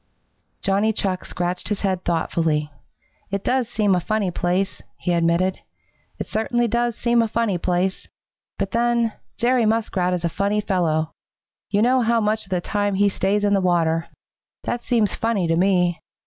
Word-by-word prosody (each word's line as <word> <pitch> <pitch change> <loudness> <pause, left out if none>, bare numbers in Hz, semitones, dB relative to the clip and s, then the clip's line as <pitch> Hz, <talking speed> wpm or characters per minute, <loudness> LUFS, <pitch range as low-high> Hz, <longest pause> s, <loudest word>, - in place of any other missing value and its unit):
Johnny 200 +2 +2
Chuck 190 -3 -2
scratched 180 +2 -3
his 210 - -2
head 185 -2 -1
thoughtfully. 160 -2 0 0.6
"It 200 0 -3
does 255 -2 +1
seem 210 -4 +2
a 180 - +3
funny 205 +1 -1
place," 180 +3 -1 0.2
he 175 - -1
admitted. 170 +2 +1 0.6
"It - - -4
certainly 240 +2 0
does 235 +1 0
seem 235 0 +3
a 230 - +1
funny 220 -5 0
place. 180 +2 -1 0.5
But 195 - -2
then, 235 -1 +1 0.2
Jerry 240 -1 +2
Muskrat 195 -5 +1
is 175 - -3
a - - +3
funny 200 +5 0
fellow. 165 -6 0 0.6
You 205 +1 +2
know 255 +2 +4
how 235 0 +2
much 215 0 0
of - - -19
the 180 -2 0
time 205 +1 -1
he 200 +1 +3
stays 200 +2 0
in 205 0 +3
the 195 - +3
water. 165 -2 +1 0.6
That 240 - -2
seems 230 -4 +1
funny 225 -5 0
to 165 - +2
me. 180 -2 +2
195 Hz, 170 wpm, -22 LUFS, 180-225 Hz, 0.6 s, know